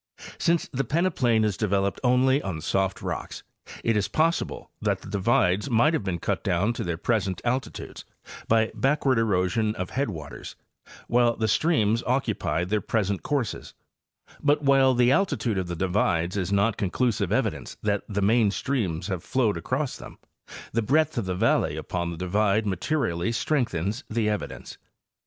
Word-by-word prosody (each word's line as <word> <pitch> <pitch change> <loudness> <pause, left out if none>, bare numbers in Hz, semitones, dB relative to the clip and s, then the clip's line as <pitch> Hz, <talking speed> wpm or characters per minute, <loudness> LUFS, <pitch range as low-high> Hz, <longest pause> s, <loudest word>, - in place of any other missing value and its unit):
Since 170 -1 +1
the 135 +1 -1
peneplain 125 -6 +1
is 105 -3 0
developed 100 -2 0
only 130 +2 +3
on 90 - -4
soft 95 +4 -1
rocks, - - -5 0.4
it 115 - +2
is 100 -2 +1
possible 160 +9 -1
that - - 0
the - - -11
divides 100 +2 +1
might 120 +7 +3
have 160 - 0
been 95 -3 -2
cut - - -2
down 100 +7 +1
to 120 - -4
their 85 -4 -2
present 95 -2 0
altitudes 125 +2 -3 0.4
by 110 0 +3
backward 135 -2 +2
erosion 105 +1 +1
of 90 0 -4
headwaters 85 - -4 0.5
while 120 -1 +3
the 110 - -1
streams 115 -4 +2
occupied 120 -8 0
their 105 0 +1
present 100 -3 -1
courses; 140 -6 -3 0.7
but 145 0 +2
while 135 -2 +4
the 120 +1 +4
altitude 135 - +1
of 90 - -3
the 85 - -4
divides 90 -1 0
is 100 -1 -2
not 100 +2 +2
conclusive 110 +3 0
evidence - - -1
that 105 -1 +1
the 100 -1 -1
main 110 +1 +4
streams 95 - -2
have 95 -4 -3
flowed 120 -7 +1
across 130 - -2
them, - - -11 0.6
the 115 - +2
breadth 155 +7 +2
of 120 -5 -1
the 90 -1 -2
valley - - +1
upon 85 -1 -3
the 85 - -6
divide 100 +4 +1
materially 100 - -1
strengthens 115 - -1
the 110 -1 0
evidence. 105 -1 -4
110 Hz, 160 wpm, -26 LUFS, 95-130 Hz, 0.7 s, while